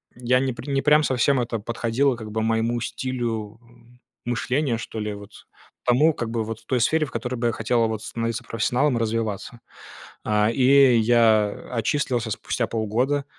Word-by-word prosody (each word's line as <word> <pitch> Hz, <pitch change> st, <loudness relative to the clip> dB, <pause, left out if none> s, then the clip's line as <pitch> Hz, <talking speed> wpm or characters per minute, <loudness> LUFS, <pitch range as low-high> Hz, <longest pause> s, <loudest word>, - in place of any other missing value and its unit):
я 125 Hz, +1 st, +1 dB
не 130 Hz, -1 st, -1 dB
пр 125 Hz, -, -10 dB
не 135 Hz, -1 st, +1 dB
прям 150 Hz, +2 st, +4 dB
совсем 130 Hz, 0 st, +2 dB
это 115 Hz, -2 st, -2 dB
подходило, 120 Hz, +4 st, 0 dB
как 110 Hz, -2 st, -8 dB
бы, 110 Hz, +1 st, -2 dB
моему 115 Hz, +2 st, 0 dB
стилю, 115 Hz, -4 st, -4 dB
м, 120 Hz, 0 st, -22 dB, 0.3 s
мышления, 125 Hz, +2 st, -1 dB
что 110 Hz, 0 st, -7 dB
ли, 105 Hz, 0 st, -3 dB
вот, 100 Hz, +1 st, -11 dB, 0.5 s
тому, 145 Hz, +6 st, +4 dB
как 120 Hz, -5 st, -4 dB
бы, 115 Hz, -1 st, -1 dB
вот 110 Hz, 0 st, -7 dB
той 125 Hz, -2 st, +1 dB
сфере, 155 Hz, +5 st, +2 dB
в 140 Hz, -, -12 dB
которой 125 Hz, +2 st, -3 dB
бы 120 Hz, 0 st, -1 dB
я 115 Hz, -, 0 dB
хотел, 115 Hz, +2 st, +1 dB
а, 115 Hz, -, +2 dB
вот 110 Hz, -1 st, -4 dB
становиться 115 Hz, +2 st, -3 dB
профессионалом, 120 Hz, +4 st, 0 dB
развиваться. 115 Hz, 0 st, -3 dB, 0.6 s
А, 105 Hz, 0 st, +2 dB
и 130 Hz, 0 st, +5 dB
я, 110 Hz, -2 st, +4 dB
э, -, -, -12 dB
отчислился 120 Hz, -1 st, -1 dB
спустя -, -, -2 dB
полгода, 120 Hz, +6 st, -1 dB
120 Hz, 180 wpm, -23 LUFS, 110-130 Hz, 0.6 s, и